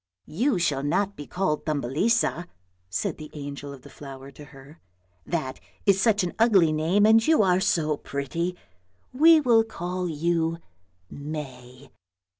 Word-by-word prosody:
" -, -, -58 dB, 0.2 s
You 270 Hz, -4 st, +3 dB
shall 150 Hz, -6 st, 0 dB
not 195 Hz, +8 st, -1 dB
be 145 Hz, -, -9 dB
called 180 Hz, -5 st, -1 dB
Thumbelisa," 155 Hz, -, 0 dB, 0.4 s
said 90 Hz, +1 st, -2 dB
the 155 Hz, -1 st, -9 dB
angel 145 Hz, -1 st, -7 dB
of 135 Hz, -2 st, -12 dB
the -, -, -13 dB
flower 135 Hz, -1 st, -10 dB
to 145 Hz, +2 st, -13 dB
her; 140 Hz, +3 st, -16 dB, 0.2 s
" 90 Hz, -1 st, -41 dB
that 145 Hz, -6 st, -3 dB, 0.3 s
is 195 Hz, -1 st, +3 dB
such 215 Hz, -2 st, +3 dB
an 175 Hz, -, -3 dB
ugly 195 Hz, -9 st, +4 dB
name, 170 Hz, +7 st, +2 dB
and 225 Hz, +1 st, +5 dB
you 315 Hz, -8 st, +4 dB
are 180 Hz, -1 st, +3 dB
so 155 Hz, -5 st, +1 dB
pretty. 165 Hz, +7 st, -4 dB, 0.6 s
We 320 Hz, +4 st, +6 dB
will 235 Hz, -6 st, +4 dB
call 180 Hz, -4 st, -4 dB
you 165 Hz, +1 st, 0 dB, 0.5 s
May." 135 Hz, -3 st, -8 dB
165 Hz, 155 wpm, -25 LUFS, 140-195 Hz, 0.6 s, We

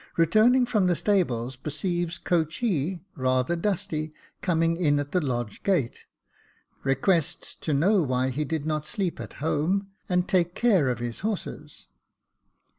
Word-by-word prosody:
Returning 220 Hz, +10 st, +5 dB
from 215 Hz, -6 st, +2 dB
the 175 Hz, -, +3 dB
stables, 145 Hz, -, 0 dB
perceives 170 Hz, +5 st, -2 dB
coachee, 170 Hz, -, -1 dB
rather 130 Hz, +4 st, +1 dB
dusty, 160 Hz, -4 st, -2 dB, 0.3 s
coming 165 Hz, -1 st, +2 dB
in 150 Hz, -4 st, +2 dB
at 145 Hz, 0 st, -4 dB
the 180 Hz, -, +2 dB
lodge 120 Hz, -6 st, -3 dB
gate; 175 Hz, -12 st, 0 dB, 0.8 s
requests 140 Hz, +4 st, +1 dB
to 155 Hz, -, -2 dB
know 180 Hz, +8 st, +3 dB
why 130 Hz, -3 st, 0 dB
he 140 Hz, +4 st, -1 dB
did 150 Hz, 0 st, -3 dB
not 155 Hz, -1 st, -2 dB
sleep 195 Hz, -6 st, -2 dB
at -, -, -7 dB
home 170 Hz, +6 st, -1 dB, 0.2 s
and 180 Hz, 0 st, +1 dB
take 180 Hz, -2 st, +1 dB
care 195 Hz, -, +3 dB
of 125 Hz, -, -1 dB
his 120 Hz, 0 st, -5 dB
horses. 190 Hz, -8 st, -5 dB
165 Hz, 140 wpm, -26 LUFS, 140-185 Hz, 0.8 s, Returning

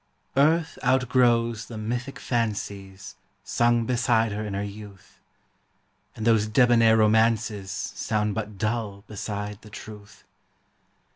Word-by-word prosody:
ARTH 160 Hz, +4 st, +2 dB
outgrows 120 Hz, -3 st, +2 dB
the 115 Hz, -, -8 dB
mythic 120 Hz, +5 st, -4 dB
fancies 100 Hz, -4 st, -4 dB, 0.3 s
Sung 120 Hz, -1 st, +2 dB
beside 115 Hz, -2 st, +2 dB
her 105 Hz, +1 st, -3 dB
in 105 Hz, -2 st, -4 dB
her 100 Hz, -, -2 dB
youth; 100 Hz, -1 st, -11 dB, 1.0 s
And 110 Hz, -, -5 dB
those 110 Hz, -2 st, +3 dB
debonair 115 Hz, -1 st, +5 dB
romances 110 Hz, -2 st, +2 dB
Sound 105 Hz, -1 st, -2 dB
but 105 Hz, -1 st, -5 dB
dull 105 Hz, -1 st, -2 dB
beside 105 Hz, 0 st, -5 dB
the 110 Hz, -, -14 dB
truth. 105 Hz, -1 st, -11 dB
110 Hz, 115 wpm, -25 LUFS, 105-120 Hz, 1.0 s, debonair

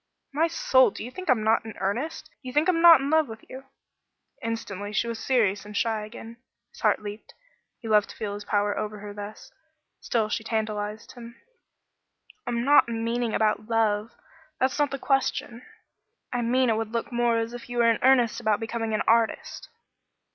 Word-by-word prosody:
"My 320 Hz, +4 st, +2 dB
soul! 260 Hz, -5 st, +4 dB
Do -, -, -8 dB
you 245 Hz, -, -7 dB
think 370 Hz, +3 st, -8 dB
I'm 235 Hz, -4 st, +3 dB
not 220 Hz, +1 st, +3 dB
in 220 Hz, -1 st, -9 dB
earnest? 245 Hz, +12 st, -3 dB
Do 290 Hz, -3 st, -16 dB
you 255 Hz, -, -6 dB
think 300 Hz, +2 st, +2 dB
I'm 340 Hz, -3 st, +2 dB
not 330 Hz, -4 st, +9 dB
in 275 Hz, +2 st, -2 dB
love 315 Hz, -2 st, +3 dB
with 220 Hz, -1 st, -10 dB
you?" 265 Hz, +1 st, -10 dB, 0.8 s
Instantly 205 Hz, -3 st, -4 dB
she 235 Hz, -, 0 dB
was 230 Hz, -1 st, -4 dB
serious 215 Hz, -7 st, +1 dB
and 210 Hz, 0 st, -7 dB
shy 220 Hz, -2 st, 0 dB
again. 225 Hz, +1 st, -10 dB, 0.3 s
His -, -, -16 dB
heart -, -, +2 dB
leaped. 205 Hz, +1 st, -9 dB, 0.4 s
He 230 Hz, -, -10 dB
loved 210 Hz, -1 st, +3 dB
to -, -, -10 dB
feel 210 Hz, -2 st, -4 dB
his 205 Hz, 0 st, -7 dB
power 205 Hz, -1 st, 0 dB
over 215 Hz, 0 st, -4 dB
her 205 Hz, 0 st, -8 dB
thus. 205 Hz, +1 st, -9 dB, 0.5 s
Still 225 Hz, -3 st, 0 dB
she 220 Hz, -, -3 dB
tantalized 215 Hz, -1 st, -3 dB
him. 235 Hz, -1 st, -11 dB, 1.1 s
"I'm 240 Hz, 0 st, -1 dB
not 285 Hz, -3 st, +5 dB
meaning 230 Hz, 0 st, -1 dB
about 215 Hz, -1 st, +1 dB
loving 215 Hz, -2 st, +1 dB
me. -, -, -33 dB, 0.4 s
That's 260 Hz, +3 st, 0 dB
not 290 Hz, -1 st, +2 dB
the 275 Hz, -, -4 dB
question. 265 Hz, -3 st, -1 dB, 0.7 s
I 245 Hz, -, 0 dB
mean 250 Hz, +1 st, +2 dB
it 220 Hz, -, +1 dB
would 225 Hz, 0 st, -4 dB
look 230 Hz, +2 st, -3 dB
more 240 Hz, -1 st, +2 dB
as 230 Hz, +1 st, -2 dB
if 245 Hz, 0 st, -9 dB
you 245 Hz, -, -5 dB
were 235 Hz, -1 st, +5 dB
in 225 Hz, -, -1 dB
earnest 250 Hz, -3 st, +4 dB
about 215 Hz, -3 st, +1 dB
becoming 225 Hz, -1 st, -3 dB
an -, -, 0 dB
artist." 230 Hz, 0 st, +1 dB
230 Hz, 200 wpm, -26 LUFS, 215-250 Hz, 1.1 s, not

